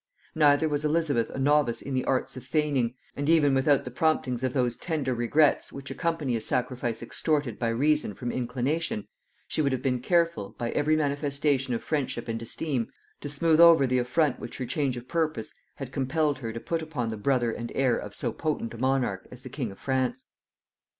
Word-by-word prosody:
Neither 150 0 +4
was 145 -1 -1
Elizabeth 150 -6 +1
a - - -7
novice 140 -3 +2
in 140 - -6
the 130 -1 0
arts 130 -1 0
of 130 - -8
feigning; 140 -6 0 0.2
and 145 +2 -2
even 150 -4 +5
without 135 +1 +3
the 125 - -5
promptings 130 -3 0
of 130 - +1
those 125 -3 0
tender 145 -5 -2
regrets 130 +6 +2
which 140 0 -8
accompany 165 -7 -1
a 115 - -2
sacrifice 120 -1 -2
extorted 145 -2 -1
by 120 - 0
reason 140 -1 +1
from 120 -1 -4
inclination, 125 0 -2 0.4
she - - -1
would 140 -2 +2
have 130 -1 -2
been 125 -2 +1
careful, 170 - +1
by 120 -1 -2
every 155 +1 +2
manifestation 140 -3 0
of - - -4
friendship 135 -6 -2
and 115 0 -3
esteem, 125 +1 -3 0.3
to 145 - -6
smooth 160 +3 +2
over 170 -4 +8
the 125 0 +2
affront 130 +3 +1
which - - -7
her 130 - -3
change 130 0 -1
of 120 +1 -8
purpose 155 -9 -1 0.2
had 135 -2 -7
compelled 145 +1 0
her 115 -3 -4
to 115 - -5
put 165 +6 -2
upon 150 -8 -3
the 110 - -3
brother 120 +2 +1
and 120 +1 -5
heir 130 -3 +3
of 105 0 -6
so 120 - -2
potent 150 -8 -2
a 115 - -9
monarch 130 -7 0
as 125 0 -12
the 130 - -8
king 125 -3 -3
of 95 - -12
France. 130 -1 -1
135 Hz, 200 wpm, -27 LUFS, 120-150 Hz, 0.4 s, over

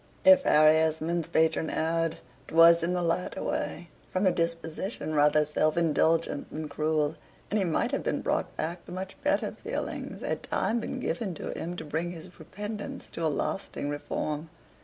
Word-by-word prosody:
If 285 -1 +9
Harry 155 +1 +6
Esmond's 160 +1 0
patron 160 0 +2
erred, 165 0 0 0.3
'twas 165 +1 +7
in 170 +2 0
the 180 -1 0
latter 170 +2 -1
way, 170 +1 -3 0.2
from 185 +2 +1
a 185 - +5
disposition 165 +1 -2
rather 150 0 +4
self 155 +1 +1
indulgent 165 -2 +2
than 155 0 -5
cruel; 155 +1 0 0.3
and 215 - +2
he 195 - +1
might 165 - 0
have - - 0
been - - -1
brought - - -1
back 170 +2 -3
to - - -9
much 185 +1 -5
better - - +1
feelings, - - -5
had - - -2
time 235 +2 0
been 255 +3 -4
given 210 -8 -2
to - - -5
him 175 +2 -4
to 160 - -6
bring 165 +4 -2
his 175 +2 -12
repentance 210 +2 -6
to 165 - -5
a - - +3
lasting 145 -1 -3
reform. 150 +1 -3
165 Hz, 175 wpm, -28 LUFS, 155-180 Hz, 0.3 s, If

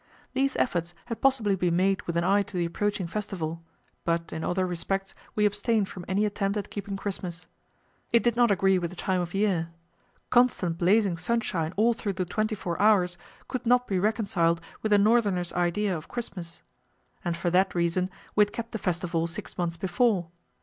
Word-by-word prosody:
These 270 +1 +1
efforts 175 -6 0
had 230 -2 -5
possibly 240 -7 +3
been 175 -2 +1
made 190 +2 +2
with 170 -1 -1
an 170 - +2
eye 200 +3 +4
to 195 -1 -5
the 175 - +1
approaching 200 +2 -1
festival, 170 -4 -4 0.4
but 170 0 -1
in 160 0 -4
other 185 +1 0
respects 190 +2 -2 0.2
we 210 - +3
abstained 205 0 +1
from 180 -2 -8
any 200 +3 +1
attempt 200 0 -1
at 205 - -4
keeping 200 -1 -4
Christmas. 180 -3 -5 0.7
It 235 - +4
did 240 -1 +2
not 240 -1 +4
agree 195 -1 +3
with 170 -1 -2
the 180 - -11
time 185 0 0
of 175 +1 -5
year; 190 -5 +1 0.6
constant 215 -9 +3
blazing 195 0 +3
sunshine 180 -4 -1
all 230 +3 +4
through 210 -3 -3
the 185 0 -2
twenty 215 +4 -1
four 175 -3 -3
hours 185 -5 +4 0.3
could 255 - -3
not 250 +1 +4
be 190 -5 0
reconciled 195 -5 +1 0.2
with 220 - -1
a 205 - +7
northerner's 200 -4 +2
idea 180 +3 +1
of 155 - -7
Christmas. 180 -8 -6 0.6
And 170 -1 -1
for 175 0 -1
that 185 +2 +3
reason 175 +2 +1 0.3
we 210 - +5
had 205 0 +3
kept 230 0 -5
the 225 - -3
festival 170 -2 -1
six 170 - -6
months 170 -1 -2
before. 190 -1 +1
190 Hz, 190 wpm, -27 LUFS, 175-210 Hz, 0.7 s, a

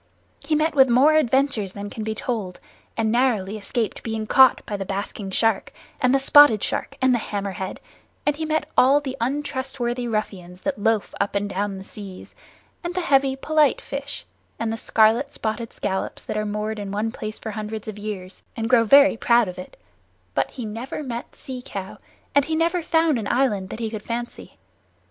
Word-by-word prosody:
He 310 - 0
met 310 +1 +1
with 265 -3 +5
more 265 +6 +5
adventures 265 -8 +2
than 205 0 -7
can 220 - -5
be 220 0 -3
told, 215 -6 -4 0.4
and 220 -1 +1
narrowly 225 -5 +1
escaped 215 +1 -3
being 220 -1 -3
caught 260 +3 +5
by 210 - -4
the 195 - -3
Basking 195 +1 -4
Shark, 220 +1 +1 0.3
and 250 - +4
the 275 - +5
Spotted 270 -5 +7
Shark, - - -3
and 260 -1 +5
the 240 - +2
Hammerhead, 195 -3 -4 0.5
and 295 - +2
he 320 - -4
met 315 0 0
all 275 +3 +6
the 270 -2 -5
untrustworthy 260 -2 -2
ruffians 185 -5 -4
that 280 -6 -2
loaf 225 -1 +1
up 200 0 -1
and 200 0 0
down 200 0 -2
the 190 - -8
seas, 195 -2 -10 0.5
and 350 +1 -4
the 365 - 0
heavy 275 -5 +3
polite 300 +1 +2
fish, 280 0 -6 0.3
and 225 -1 -2
the - - -1
scarlet 225 +5 +3
spotted 225 -1 -4
scallops 190 -1 -3
that - - -4
are 215 0 -1
moored 210 +1 -3
in 200 -1 -5
one 210 +3 -1
place 215 -1 -6
for 220 - -6
hundreds 215 0 -5
of 210 -1 -6
years, 195 -3 -6 0.2
and 225 +1 -2
grow 240 -2 +6
very 280 +4 +7
proud 235 -1 +3
of 180 0 -7
it; 180 - -10 0.6
but - - 0
he 250 -4 -7
never 230 +7 -5
met 240 -3 -6
Sea 255 -2 -7
Cow, 195 -4 -7 0.3
and 285 -1 +4
he 320 +1 -1
never 335 +2 +1
found 320 -4 +2
an 210 - -4
island 210 -7 +1
that - - -6
he 225 -2 -3
could 215 -2 -5
fancy. 240 +2 -6
225 Hz, 195 wpm, -23 LUFS, 205-270 Hz, 0.6 s, Spotted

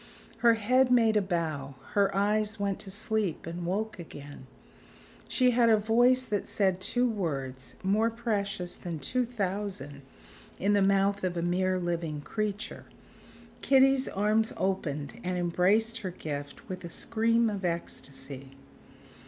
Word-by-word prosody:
Her 235 0 +5
head 250 +4 +3
made 225 -3 +5
a 210 - +4
bow; 160 -7 -2 0.2
her 200 -2 +4
eyes 210 +2 +1
went 200 -1 -1
to 195 - -8
sleep 215 -3 -1
and 170 +1 -5
woke 210 +3 -2
again; 145 -5 -10 0.8
she 255 -1 +3
had 235 -1 +4
a 220 - +6
voice 240 +4 +4
that 210 -5 -2
said 190 -2 +1
two 245 +5 +1
words 135 - -3
more 210 +4 +3
precious 200 -6 -2
than 170 -2 -5
two 250 +10 0
thousand 200 - -4 0.6
in 200 +2 +2
the 200 - +4
mouth 195 +1 +2
of 180 -1 -1
a 170 - -1
mere 185 +1 +1
living 170 -4 -2
creature. 210 +5 -4 0.8
Kitty's 270 0 +4
arms 215 +2 +1
opened 150 -7 -2
and 180 0 -1
embraced 195 +6 +2
her 195 -5 -4
gift 145 -5 -6
with 185 -1 -6
a 170 - -6
scream 230 +5 +1
of 200 -3 -3
ecstasy. 140 -5 -5
200 Hz, 145 wpm, -29 LUFS, 170-220 Hz, 0.8 s, a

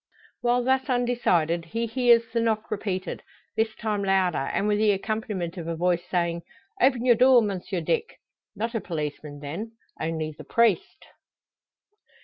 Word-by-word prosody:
While 245 0 +2
thus 265 +2 +1
undecided, 235 -10 +1
he 230 +8 -2
hears 235 0 +4
the 230 - +2
knock 225 -1 -1
repeated; 195 -3 -3 0.3
this 220 0 0
time 210 -2 -2
louder, 185 -7 +1
and 205 - 0
with 210 0 +2
the 215 -1 +4
accompaniment 195 -3 -3
of 165 -2 -5
a 165 - -2
voice, 175 +1 +1
saying: 170 -1 0 0.4
"Open 255 -2 +3
your 245 - +7
door, 255 +2 +6
Monsieur 190 -3 -3
Dick." 460 - -1 0.4
Not 225 +4 -3
a 225 - -1
policeman, 150 -3 -5
then; 180 +11 -6 0.3
only 160 -1 -2
the - - -10
priest! 230 -7 +1
210 Hz, 150 wpm, -26 LUFS, 170-235 Hz, 0.4 s, your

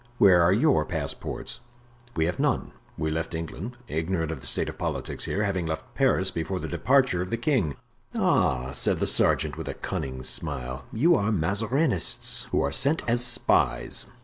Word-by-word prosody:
Where 90 -6 +6
are 85 +1 +4
your 135 +9 +3
passports?" 80 +6 -4 0.6
"We 80 - +1
have 85 0 -2
none; - - 0 0.3
we 80 0 -1
left 80 +1 -3
England, 90 +9 -6
ignorant 80 0 -2
of 75 -5 -6
the - - -5
state - - +1
of - - -7
politics - - -3
here, 105 - -1
having 95 -5 -1
left 80 0 -5
Paris 125 -9 +2
before 90 +2 -3
the 80 - -5
departure 130 - +2
of 90 - -4
the 115 - -1
king." 115 - 0 0.4
"Ah!" 65 0 +1
said 70 - +2
the - - +1
sergeant, - - +3
with - - -6
a - - -4
cunning 65 -1 -4
smile, 65 -1 -3
"you 160 +10 +3
are 110 -8 +1
Mazarinists, 105 - 0
who - - +1
are 70 - 0
sent 140 - +1
as 120 +1 +2
spies." 120 0 +2
90 Hz, 175 wpm, -26 LUFS, 80-115 Hz, 0.6 s, Where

